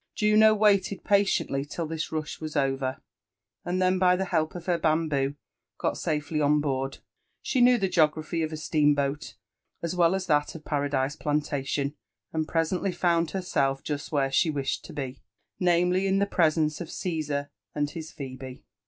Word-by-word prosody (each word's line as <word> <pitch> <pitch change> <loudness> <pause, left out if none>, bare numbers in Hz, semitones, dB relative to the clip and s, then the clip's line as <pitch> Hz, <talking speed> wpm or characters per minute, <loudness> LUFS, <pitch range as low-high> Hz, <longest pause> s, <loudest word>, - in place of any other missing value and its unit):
Juno 215 +1 +5
waited 200 -2 +2
patiently 200 -9 +2
till 155 +3 -4
this 160 0 -4
rush 155 -1 -4
was 155 0 -5
over, 135 -2 -1 0.6
and 180 +1 -1
then 185 0 +2
by 180 -1 +5
the 190 +1 -1
help 160 -3 0
of 175 - -7
her 175 -2 +1
bamboo 155 -3 +1 0.4
got - - -1
safely 150 0 -2
on 150 +1 +3
board. 135 -2 -2 0.5
She 255 - +1
knew 245 0 +6
the 195 -4 +1
geography 155 -1 +1
of 160 0 -1
a 155 - -4
steam 150 -1 +2
boat 140 +1 -2 0.5
as 170 +2 -2
well 175 +1 +4
as 190 -1 -2
that 150 -3 +1
of 160 - -10
Paradise 145 -1 0
Plantation, 145 -2 -1 0.4
and 160 -1 -1
presently 175 +3 0
found 170 -1 +1
herself 140 -8 -1
just 150 -1 -4
where 140 -3 +1
she 160 - +3
wished 140 -3 -2
to - - -10
be; 135 -3 -5 0.4
namely, 180 +1 +2
in 190 0 +2
the 200 - +3
preseirce 160 -4 +1
of 170 - -6
Caesar 150 -6 -3 0.2
and 145 -1 -1
his 160 -1 -7
Phebe. 130 -2 -8
155 Hz, 170 wpm, -27 LUFS, 145-180 Hz, 0.6 s, knew